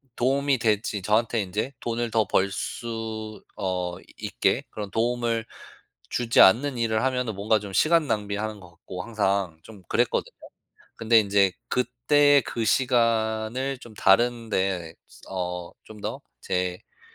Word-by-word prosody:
도움이 135 +1 +1
될지 105 -2 0
저한테 110 +3 +2
인제 105 +8 -3
돈을 120 0 -2
더 110 -1 +2
벌 95 +1 +2
수 110 -2 -5
어 90 -3 -2 0.2
있게 - - 0
그런 105 -2 -6
도움을 115 0 0 0.6
주지 120 -1 +3
않는 125 +7 +5
일을 110 -1 0
하면은 125 -3 0
뭔가 105 +3 +2
좀 100 -2 -8
시간 165 - +4
낭비하는 105 -1 -2
거 90 - -13
같고 90 +2 -8
항상 100 -6 -1
좀 105 -3 -13
그랬거든요. - - 0 0.6
근데 115 0 +4
인제 100 -2 +3 0.2
그때 140 +4 +3
그 115 - -2
시간을 115 +1 +1
좀 120 -3 -13
다른 115 +4 +3
데 95 -4 -1 0.4
어 90 -2 -4
좀 110 -1 -12
더 - - -5 0.2
제가 90 0 -3
110 Hz, 250 characters per minute, -25 LUFS, 100-120 Hz, 0.6 s, 않는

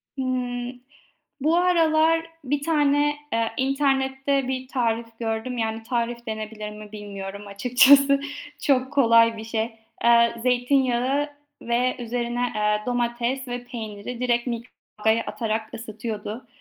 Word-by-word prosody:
Hıı, 250 -2 -2 0.7
bu 315 +5 +3
aralar 330 -2 +3 0.2
bir 285 +2 -1
tane, 295 -1 +2 0.2
eee, 225 0 0
internette 270 0 +1
bir 260 0 -3
tarif 230 -3 -1
gördüm. 230 +2 -3
Yani 225 0 -2
tarif 235 0 -2
denebilir 215 -1 -5
mi 210 0 -11
bilmiyorum 200 -1 -7
açıkçası, 270 +7 +5 0.4
çok 260 -1 +2
kolay 230 -4 +5
bir 220 - -7
şey. 225 0 -2 0.3
Eee, 235 0 +5
zeytinyağı 255 +2 +2 0.3
ve 245 +2 +1
üzerine, 240 0 -2
eee, 210 0 +1
domates 245 +2 -1
ve 245 0 -4
peyniri 230 -1 -7
direkt 240 -1 +1
mikrodalgaya 230 -2 -2
atarak 220 -1 -3
ısıtıyordu. 220 +1 -6
245 Hz, 115 wpm, -24 LUFS, 225-265 Hz, 0.7 s, açıkçası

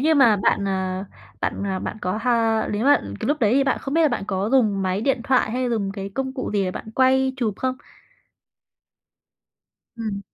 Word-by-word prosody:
như 315 +3 +3
mà 240 -8 +5
bạn, 200 0 +1
ờ, 190 -1 -2 0.4
bạn, - - -2
ờ, 190 -1 -2
bạn - - -5
có 185 +3 -2
ha 230 -3 +2
nếu 210 +3 -1
mà 285 +1 +6 0.2
cái - - -2
lúc 295 0 0
đấy 215 -2 +3
thì 275 +1 +3
bạn 270 - +1
không 275 - -5
biết 330 - +4
là 310 - +5
bạn 245 - -2
có 195 +1 -1
dùng 215 -7 +3
máy 185 +1 -1
điện 265 +1 +1
thoại 255 -4 +2
hay 250 +2 -1
dùng 200 -4 -1
cái 195 -1 -5
công 265 -1 -2
cụ 260 - -4
gì 200 -2 +1
để 185 - -1
bạn 220 - -8
quay 265 0 +3
chụp 225 -5 -1
không? 260 0 -2 2.2
Ừm. 215 -3 -4
225 Hz, 215 wpm, -23 LUFS, 200-265 Hz, 2.2 s, mà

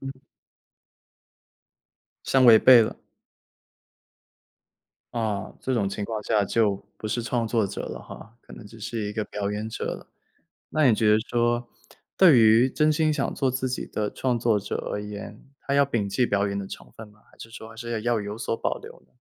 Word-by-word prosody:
嗯。 135 0 -8 2.1
相 130 -1 +3
违 115 -2 +9
背 125 -3 +8
了。 110 - -4 2.1
啊， 110 -4 -2
这 130 - -1
种 100 -4 0
情 100 +1 -4
况 110 0 -4
下 105 -1 +1
就 105 -1 +1 0.2
不 110 - -6
是 120 +2 -2
创 120 -1 -1
作 110 -2 +1
者 - - -6
了 - - -6
哈， 115 +1 -12
可 - - -16
能 - - -11
只 115 +2 -14
是 110 -1 -4
一 - - -5
个 110 0 -2
表 100 -1 -4
演 105 +2 -4
者 - - -5
了。 - - -5 0.6
那 155 -3 +3
你 115 - +5
觉 105 0 +2
得 105 - +5
说， 120 0 0 0.5
对 170 -9 +7
于 115 +3 +5
真 155 0 +2
心 155 0 +1
想 - - -2
做 135 -2 0
自 130 0 -2
己 125 - -4
的 105 -1 -3
创 125 -2 -1
作 115 -2 +2
者 100 - -4 0.2
而 105 - -3
言， 105 +1 -9 0.2
他 140 - -3
要 140 0 +5
摒 115 -7 -2
弃 125 +6 +1
表 100 -1 +1
演 100 - -3
的 100 - -5
成 - - -11
分 110 -1 -10
吗？ 105 0 -23
还 - - -23
是 115 - -10
说 110 -1 -10
还 115 - -14
是 120 +1 -7
要 115 - -1
要 115 -1 0
有 105 +1 -6
所 115 - -2
保 - - -2
留 - - -13
呢？ - - -36
115 Hz, 220 characters per minute, -25 LUFS, 105-125 Hz, 2.1 s, 违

